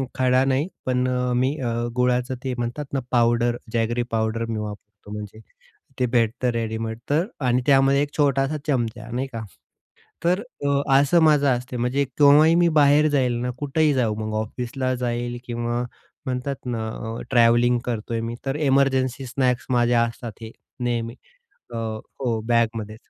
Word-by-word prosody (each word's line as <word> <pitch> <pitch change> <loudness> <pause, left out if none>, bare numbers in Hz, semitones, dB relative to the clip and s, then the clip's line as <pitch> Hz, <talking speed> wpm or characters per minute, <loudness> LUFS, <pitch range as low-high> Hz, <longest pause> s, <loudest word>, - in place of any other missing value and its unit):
खडा 130 0 +3
नाही, 135 +4 +1 0.2
पण 125 0 +1
अ, 125 0 0
मी 130 +4 +1
अ, 120 - -1 0.3
गुळाचं 125 +1 +1
ते 130 -1 -2
म्हणतात 120 +5 -3
ना 135 - +1
पावडर, 120 0 +3 0.2
जॅगरी 120 +1 0
पावडर 110 +1 0
मी 110 -1 -2
वापरतो 105 -1 -9
म्हणजे, 105 0 -7 0.6
ते 125 - +3
भेटतं 120 +1 +1
रेडीमेड 110 -1 -3
तर 160 +4 +2 0.2
आणि 125 0 +2
त्यामध्ये 135 0 +4
1 145 - -5
छोटासा 140 0 +2
चमचा, 120 -6 -1
नाही 130 +3 -2
का? 115 - -4 0.8
तर 180 +4 +2 0.2
अ, 140 0 +2 0.2
असं 160 +4 +3
माझं 145 -2 +4
असते. 125 +1 -7
म्हणजे 125 +4 +1
केव्हाही 150 +4 +5
मी 175 0 +4
बाहेर 145 +2 +5
जाईल 130 -4 +2
ना, 125 - -1
कुठेही 150 +1 +1
जाऊ, 120 -5 +1
मग 110 - -4
ऑफिसला 125 +3 -3
जाईल 120 -1 -3
किंवा 120 0 -2 0.4
म्हणतात 130 +2 -2
ना 115 -3 -2
अ, 110 +1 -6
ट्रॅव्हलिंग 120 0 +4
करतोय 115 -1 -2
मी, 115 +1 -4
तर 135 - -1
एमर्जन्सी 135 -2 +2
स्नॅक्स 125 -1 0
माझे 120 -1 +2
असतात 115 -1 -2
हे 110 - -7 0.3
नेहमी 115 -1 -2 0.6
अ, 120 - -10
हो, 115 +1 -3
बॅगमध्ये. 115 -2 0
125 Hz, 155 wpm, -23 LUFS, 115-135 Hz, 0.8 s, केव्हाही